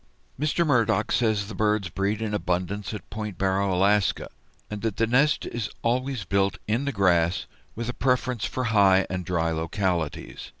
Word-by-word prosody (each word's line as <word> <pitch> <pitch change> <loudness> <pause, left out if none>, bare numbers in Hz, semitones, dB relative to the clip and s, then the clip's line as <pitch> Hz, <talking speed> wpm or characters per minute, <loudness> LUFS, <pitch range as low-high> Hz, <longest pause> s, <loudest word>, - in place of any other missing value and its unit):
Mr. 155 +3 +1
Murdock 115 -6 +2
says 110 -4 +1
the 110 - -7
birds 105 -1 +1
breed 100 +4 -1
in 105 -1 -3
abundance 95 +1 -2
at 105 - -7
Point 105 -3 -5
Barrow, 95 0 +1
Alaska, 100 +2 +2 0.4
and 105 -1 -6
that 115 -3 -2
the 115 - +3
nest 135 +6 +2
is 120 -4 -4
always 125 -2 -1
built 100 +2 +1
in 115 +6 0
the 140 - 0
grass, 90 -5 +2 0.3
with 115 +1 -4
a 125 - -2
preference 125 -2 0
for 130 - -3
high 95 -2 +5
and 90 0 -2
dry 85 -2 0
localities. 85 0 -2
105 Hz, 170 wpm, -25 LUFS, 95-115 Hz, 0.4 s, high